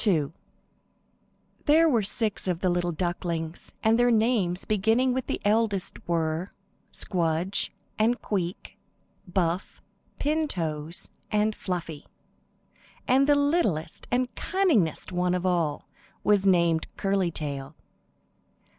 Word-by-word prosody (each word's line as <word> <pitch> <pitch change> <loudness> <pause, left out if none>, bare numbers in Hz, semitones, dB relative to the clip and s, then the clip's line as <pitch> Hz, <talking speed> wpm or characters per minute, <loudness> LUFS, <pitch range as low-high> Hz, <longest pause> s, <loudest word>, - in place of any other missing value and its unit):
II 155 -7 +2 1.4
THERE 320 +3 +6
were 240 -8 +3
six 210 0 -1
of 175 -1 -1
the 185 - +2
little 175 0 0
ducklings, 170 -1 -3
and 225 +2 +4
their 245 0 +5
names, 215 -6 +2
beginning 225 +5 +2
with 260 -1 -2
the - - -2
eldest 205 -2 0
were, 165 +1 -1 0.4
Squdge 175 +2 -1 0.3
and 235 +3 +3
Queek, 185 -3 -4 0.5
Buff, 175 0 -1 0.4
Pin 310 +2 +1
Toes 160 - -4 0.2
and 210 0 +1
Fluffy, 165 -5 -5 1.0
and 270 +2 +4
the 290 - +6
littlest 285 - 0
and 250 +1 0
cunningest 280 - +1
one 180 0 +1
of 180 0 -2
all 170 -5 0 0.4
was 205 -2 +3
named 170 -3 +3
Curly 195 -2 +1
Tail. 145 -2 -5
185 Hz, 115 wpm, -27 LUFS, 170-225 Hz, 1.4 s, THERE